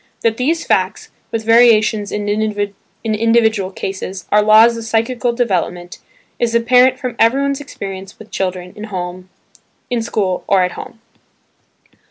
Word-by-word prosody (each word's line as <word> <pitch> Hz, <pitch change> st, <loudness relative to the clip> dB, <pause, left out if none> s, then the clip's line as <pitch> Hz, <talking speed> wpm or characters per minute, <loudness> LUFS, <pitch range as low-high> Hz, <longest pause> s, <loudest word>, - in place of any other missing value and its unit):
That 225 Hz, -1 st, +1 dB
these 325 Hz, +6 st, 0 dB
facts -, -, -1 dB, 0.2 s
(with 225 Hz, -1 st, -3 dB
variations 225 Hz, -2 st, +4 dB
in 205 Hz, 0 st, -3 dB
individual 215 Hz, +1 st, 0 dB
cases) 190 Hz, -1 st, -6 dB
are 210 Hz, -, +5 dB
laws 220 Hz, +2 st, +6 dB
of 230 Hz, -, -6 dB
psychical 230 Hz, +2 st, 0 dB
development 185 Hz, -7 st, -2 dB, 0.4 s
is 235 Hz, -1 st, 0 dB
apparent 250 Hz, +2 st, +4 dB
from 250 Hz, -3 st, -5 dB
everyone's 275 Hz, +4 st, +2 dB
experience 195 Hz, -8 st, -8 dB
with 220 Hz, -, -14 dB
children 185 Hz, -1 st, -3 dB, 1.2 s
in 240 Hz, -2 st, 0 dB
school 200 Hz, -5 st, -2 dB
or 190 Hz, -2 st, +3 dB
at 180 Hz, -, -1 dB
home. 225 Hz, -, -10 dB
220 Hz, 125 wpm, -17 LUFS, 200-235 Hz, 1.2 s, laws